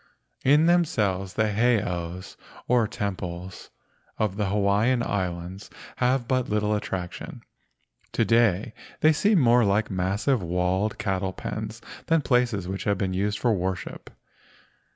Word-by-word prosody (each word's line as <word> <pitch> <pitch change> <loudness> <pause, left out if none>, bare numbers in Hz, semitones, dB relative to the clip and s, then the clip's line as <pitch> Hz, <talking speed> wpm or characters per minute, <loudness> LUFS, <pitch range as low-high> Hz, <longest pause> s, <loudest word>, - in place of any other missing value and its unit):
In 145 +4 +5
themselves 105 - +1
the 110 -1 +1
heiaus, 95 -6 -1 0.3
or 120 -3 +3
temples, 95 -4 -5 0.5
of 105 -3 0
the 105 -1 -1
Hawaiian 105 +5 +2
Islands 90 -1 -4 0.3
have 125 -1 +1
but 130 -2 0
little 105 0 +1
attraction. 95 -4 -5 0.7
To - - +2
day 115 -2 +2 0.3
they 155 +1 +6
seem 205 +6 +3
more 120 -2 +5
like 100 +1 +1
massive 100 +7 0
walled 90 +4 0
cattle 95 -1 -2
pens 110 +3 -6 0.3
than 165 -1 +3
places 125 -8 +1
which 95 +1 -4
have 100 -2 +1
been 95 -1 -1
used 100 +2 -1
for 120 -2 +2
worship. 95 -3 -4
105 Hz, 130 wpm, -25 LUFS, 95-120 Hz, 0.7 s, they